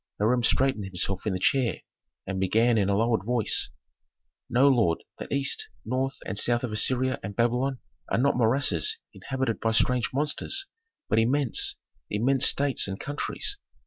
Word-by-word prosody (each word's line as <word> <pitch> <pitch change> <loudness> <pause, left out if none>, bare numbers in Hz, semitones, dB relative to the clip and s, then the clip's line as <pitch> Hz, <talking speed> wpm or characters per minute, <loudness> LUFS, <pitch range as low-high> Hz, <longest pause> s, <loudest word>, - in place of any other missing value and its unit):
Hiram 120 +4 +1
straightened 130 -3 +1
himself 95 +2 -2
in 105 - 0
the - - -1
chair, 125 +4 +1 0.4
and 95 -1 -4
began 115 +5 +2
in 100 -3 +1
a 100 - +1
lowered 115 -1 +1
voice, 120 0 +1 0.8
"Know, 125 +4 +4
lord, 115 -12 +2 0.2
that - - -8
east, 140 -1 0 0.2
north, 130 +4 -2
and 100 +2 -3
south 120 0 +2
of 125 - -3
Assyria 130 +4 +1
and 100 +1 -7
Babylon 125 +4 0 0.3
are - - +2
not 140 +4 +2
morasses 115 - +2 0.2
inhabited 130 +4 -3
by 115 - 0
strange 120 +2 +1
monsters, 150 - -2 0.4
but - - +2
immense 130 +3 +2 0.3
immense 125 +6 +3
states 140 -5 +2
and 95 0 -5
countries. 145 - -3
120 Hz, 155 wpm, -26 LUFS, 105-135 Hz, 0.8 s, Know